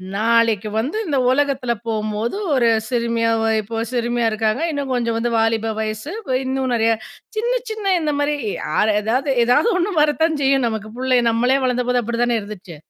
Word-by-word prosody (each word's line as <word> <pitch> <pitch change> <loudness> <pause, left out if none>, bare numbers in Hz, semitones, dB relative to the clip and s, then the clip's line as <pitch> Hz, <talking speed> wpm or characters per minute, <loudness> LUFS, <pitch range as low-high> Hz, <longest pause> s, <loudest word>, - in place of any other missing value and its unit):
நாளைக்கு 225 -1 +2
வந்து 265 - -1
இந்த 295 -6 0
உலகத்துல 265 -3 +1
போகும்போது 215 - -2 0.2
ஒரு 245 -3 +3 0.2
சிறுமியா, 230 -1 0
ஒ - - +1 0.2
இப்போ 225 +2 -6
சிறுமியா 240 -1 0
இருக்காங்க. 215 +4 0
இன்னும் 285 -3 -3
கொஞ்சம் 235 -2 0
வந்து 235 +1 0
வாலிப 225 0 +1
வயசு. 215 +6 -4 0.2
ப 255 - 0
இன்னும் 260 0 -1
நெறைய. 225 -1 +2 0.5
சின்ன, 475 +3 0 0.2
சின்ன 425 -3 -1
இந்த 305 -1 0
மாரி 290 +1 +1 0.3
யாரு 215 +1 +1
ஏதாவது 255 +7 0
ஏதாவது 250 - +3
ஒண்ணு 370 +3 0
வரத்தான் 305 +1 +1
செய்யும் 270 -2 +3
நமக்கு. 220 -1 -4
புள்ளை 255 0 +2
நம்மளே 245 +4 +2
வளர்ந்த 250 -1 0
போது 250 0 +2
அப்படி 235 +1 -3
தான 240 -1 +1
இருந்துச்சு. 200 -4 -9
240 Hz, 170 wpm, -20 LUFS, 225-270 Hz, 0.5 s, ஒரு